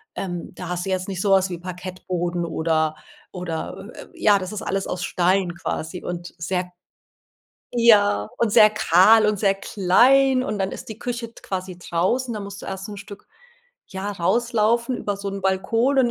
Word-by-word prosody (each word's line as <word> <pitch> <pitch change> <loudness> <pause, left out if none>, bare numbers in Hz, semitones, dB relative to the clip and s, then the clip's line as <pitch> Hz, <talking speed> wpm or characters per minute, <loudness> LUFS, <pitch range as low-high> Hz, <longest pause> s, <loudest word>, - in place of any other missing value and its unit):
ähm, 175 -3 -5
da 180 - -7
hast 180 0 -3
du - - -4
jetzt 185 -1 -1
nicht 190 -2 -4
so 200 -1 +1
was 190 0 +4
wie 175 - -4
Parkettboden 180 -1 -4
oder 160 -1 0 0.4
oder, 180 +3 -5
äh, - - -9
äh - - -13
ja, 205 -2 +3
das 185 0 -6
ist 215 - -5
alles 195 0 -2
aus 180 - -3
Stein 180 0 +1
quasi 175 0 -5
und 175 0 -6
sehr 180 +2 -2 1.1
ja, 205 - +4
und 230 -3 +1
sehr 215 -2 +7
kahl 215 +2 +5
und 210 -1 +1
sehr 195 -1 +3
klein 255 +8 +3
und 210 - -3
dann 190 - 0
ist - - -8
die 220 0 -8
Küche 240 -1 -3
d 230 - -23
quasi 185 -1 -5
draußen, 190 +9 -1
da - - -4
musst 200 0 -8
du - - -8
erst 195 +1 -6
'n 205 - -7
Stück, 200 0 -11 0.6
ja, 190 +2 -5
rauslaufen 235 +5 +1
über 205 -3 -3
so 200 0 -5
'n 195 0 -5
Balkon 225 +8 +1
und 250 - +4
195 Hz, 190 wpm, -23 LUFS, 180-215 Hz, 1.1 s, sehr